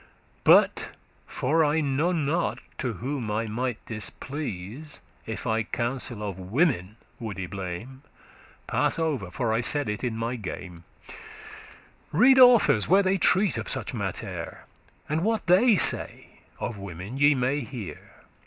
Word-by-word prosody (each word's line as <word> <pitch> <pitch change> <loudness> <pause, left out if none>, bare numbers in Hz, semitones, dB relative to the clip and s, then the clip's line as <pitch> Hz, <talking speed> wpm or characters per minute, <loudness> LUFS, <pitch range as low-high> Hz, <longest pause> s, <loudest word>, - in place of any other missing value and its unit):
But, - - +4 0.3
for 160 +6 +1
I 150 +1 +2
n'ot* 155 +3 0 0.2
to 125 -3 -2
whom 125 +2 -4
I 110 +2 -1
might 120 +2 -2
displease 125 - -6 0.3
*know - - -4
not - - -1
If - - -7
I 110 -1 +1
counsel 120 0 -3
of 95 -2 -6
women 105 - 0 0.2
woulde 100 -6 -5
blame, 100 +8 -6 0.6
Pass - - +1
over, 150 - -1
for 115 +3 -1
I 115 - +1
said 145 +2 +1
it 105 +3 -3
in 120 -3 -2
my 115 +2 -2
game.* 90 -5 -8 0.2
*jest - - -12 0.9
Read 260 - +6
authors, 240 - +6
where 195 +3 +5
they 190 0 +1
treat 190 -1 +3
of - - -5
such - - -3
mattere - - -5 0.4
And 155 +3 -1
what 220 0 0
they 200 +6 +5
say - - +1 0.2
of 115 -4 -4
women 95 +5 -7
ye 145 +1 +5
may 130 +3 0
hear. 120 -6 -9
125 Hz, 145 wpm, -26 LUFS, 105-155 Hz, 0.9 s, Read